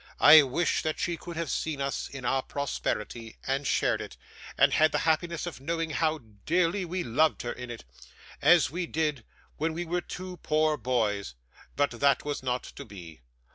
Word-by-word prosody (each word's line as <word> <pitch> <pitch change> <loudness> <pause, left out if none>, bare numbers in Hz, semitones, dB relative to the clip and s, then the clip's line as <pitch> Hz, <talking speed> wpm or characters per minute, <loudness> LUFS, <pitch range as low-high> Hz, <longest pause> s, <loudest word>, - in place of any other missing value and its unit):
I 155 +1 +10
wish 145 +5 0
that 155 -1 -2
she 175 - -1
could 170 0 -9
have 165 -4 -2
seen 155 -3 -2
us 140 0 -2
in 135 -2 -8
our 135 +2 +2
prosperity, 120 -5 -4
and 135 +1 -1
shared - - +1
it, - - -9 0.4
and - - +5
had 155 0 +4
the - - +1
happiness 165 +1 0
of 175 - -6
knowing 165 +2 -2
how 160 +1 +1 0.3
dearly 180 +3 +2
we 180 +1 -3
loved 150 +7 +2
her 120 - -3
in 125 -1 -7
it, 120 - -7 0.6
as 150 -2 +5
we 175 +1 -3
did 150 -6 -1 0.3
when 160 +2 -1
we 175 +2 -3
were 175 +1 -1
two 185 0 -7
poor 155 -1 +1
boys; 105 - -1 0.4
but 145 0 +2
that 140 +5 +2
was 145 -1 -3
not 125 -1 -1
to - - -9
be. 85 - -11
150 Hz, 185 wpm, -28 LUFS, 130-165 Hz, 0.6 s, I